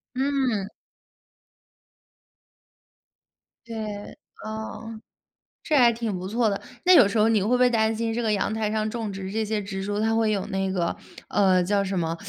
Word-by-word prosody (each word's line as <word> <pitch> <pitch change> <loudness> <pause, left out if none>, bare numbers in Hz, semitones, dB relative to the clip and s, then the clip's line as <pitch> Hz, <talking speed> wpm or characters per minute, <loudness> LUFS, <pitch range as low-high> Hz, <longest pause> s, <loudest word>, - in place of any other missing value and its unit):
嗯。 260 -7 0 2.9
对， 215 -3 -6 0.3
啊。 220 +1 -6 0.6
这 310 - 0
还 245 -4 +6
挺 225 -4 -3
不 185 +1 -5
错 225 +1 +1
的。 200 - -2 0.3
那 370 - +7
有 245 -11 +8
时 200 - -2
候 220 - +4
你 215 -4 +2
会 210 - -1
不 250 - +3
会 250 0 +4
担 220 -1 +1
心 225 +1 -1
这 240 - -2
个 220 - +1
阳 200 - 0
台 215 -1 -1
上 215 0 -1
种 220 -3 -4
植 190 -1 -6
这 220 +1 -1
些 215 0 -1
植 195 -1 -5
株， 205 +1 -2
它 225 +1 +1
会 225 -1 +2
有 200 -3 0
那 195 -1 -1
个 175 -3 -1 0.3
呃， 185 -3 +3
叫 200 +2 +1
什 190 -2 -2
么， 165 0 -2
215 Hz, 190 characters per minute, -25 LUFS, 195-225 Hz, 2.9 s, 有